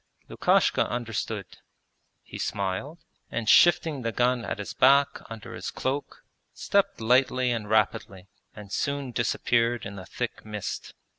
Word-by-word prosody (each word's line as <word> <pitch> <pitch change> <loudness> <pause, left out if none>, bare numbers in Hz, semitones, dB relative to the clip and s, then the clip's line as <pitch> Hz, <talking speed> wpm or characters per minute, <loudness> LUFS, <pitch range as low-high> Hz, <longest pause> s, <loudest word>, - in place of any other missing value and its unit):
Lukashka - - +2
understood. 110 -4 -3 0.8
He - - -9
smiled, 100 - -3 0.3
and 115 -2 -3
shifting 160 0 +5
the 115 -1 -2
gun 125 +1 +1
at - - -4
his 105 - -6
back 140 +2 +4
under 115 -2 -8
his - - -5
cloak 135 +2 -4 0.3
stepped 200 0 +1
lightly 125 +2 +2
and 110 -3 -3
rapidly, 95 -3 0 0.3
and 105 -2 -11
soon 140 0 -2
disappeared 120 0 +1
in 100 0 -7
the 95 -2 -9
thick - - -5
mist. 105 -2 -6
120 Hz, 135 wpm, -27 LUFS, 105-135 Hz, 0.8 s, shifting